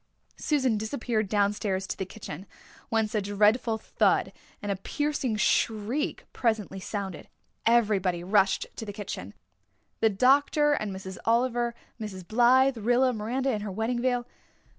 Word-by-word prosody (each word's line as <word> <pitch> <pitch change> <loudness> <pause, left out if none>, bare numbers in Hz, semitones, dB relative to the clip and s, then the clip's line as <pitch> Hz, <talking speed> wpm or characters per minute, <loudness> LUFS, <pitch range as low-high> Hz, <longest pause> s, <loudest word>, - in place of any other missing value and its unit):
Susan 260 -8 +1
disappeared 220 -2 -2
downstairs 200 -2 0
to - - -4
the 190 - -4
kitchen, 190 -3 -8 0.4
whence 220 -2 0
a 215 - +1
dreadful 210 +3 +2
thud - - +1 0.3
and 205 -1 -3
a - - 0
piercing 285 +3 -2
shriek 230 +6 0
presently 220 -5 -1
sounded. 195 -3 -5 0.4
Everybody 200 -7 +2
rushed 195 +1 +2
to - - -5
the 205 - -5
kitchen 190 - -6 0.6
the 225 - +4
doctor 285 +7 +4
and 215 -7 -2
Miss 190 -1 -7
Oliver, 235 0 +1 0.2
Mrs. 190 -5 -7
Blythe, 250 +3 +4
Rilla, 245 +4 +2
Miranda 245 +5 -1
in 215 -3 -2
her 205 -1 -4
wedding 225 +5 -1
veil. 245 -1 0
220 Hz, 140 wpm, -27 LUFS, 200-245 Hz, 0.6 s, the